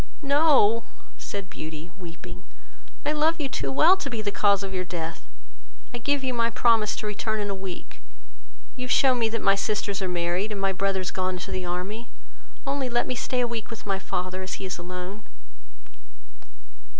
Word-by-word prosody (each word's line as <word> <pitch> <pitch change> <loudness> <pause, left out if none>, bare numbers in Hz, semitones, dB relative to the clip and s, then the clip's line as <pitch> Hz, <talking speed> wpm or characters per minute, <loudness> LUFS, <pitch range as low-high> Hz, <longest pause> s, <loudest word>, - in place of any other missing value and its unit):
"No, 280 -6 +5 0.3
(said 200 -2 -5
Beauty, 160 -1 -7
weeping,) 175 -4 -9 0.6
I 295 - +3
love 315 +2 +2
you 290 - 0
too - - -2
well 320 +7 +7
to 285 - -3
be 235 -4 -3
the 205 - 0
cause 200 -1 +3
of 195 -1 -4
your 185 -1 0
death: 170 -2 -5 0.7
I 240 - -3
give 280 +3 +1
you 260 -1 0
my 230 -1 +2
promise 230 -2 +4
to - - -4
return 215 +1 -1
in 205 -1 -1
a - - 0
week: 190 -2 -7 0.7
you 255 -1 -4
have 250 - -3
shewn 260 -2 +5
me 225 -1 +3
that 230 0 -2
my 195 - +6
sisters 200 0 0
are 190 - 0
married, 175 +4 0
and 205 - -3
my 195 0 +2
brothers 190 -1 0
gone 185 0 -1
to 180 - -6
the 185 -1 -2
army; 195 +6 -3 0.6
only 275 -2 0
let 240 0 +2
me - - -1
stay 250 0 0
a 240 - +2
week 230 -2 -4
with 230 - -8
my 195 -1 0
father, 185 0 -2
as 185 - -4
he - - -6
is 185 - -4
alone." 180 +3 -6
205 Hz, 195 wpm, -26 LUFS, 185-240 Hz, 0.7 s, well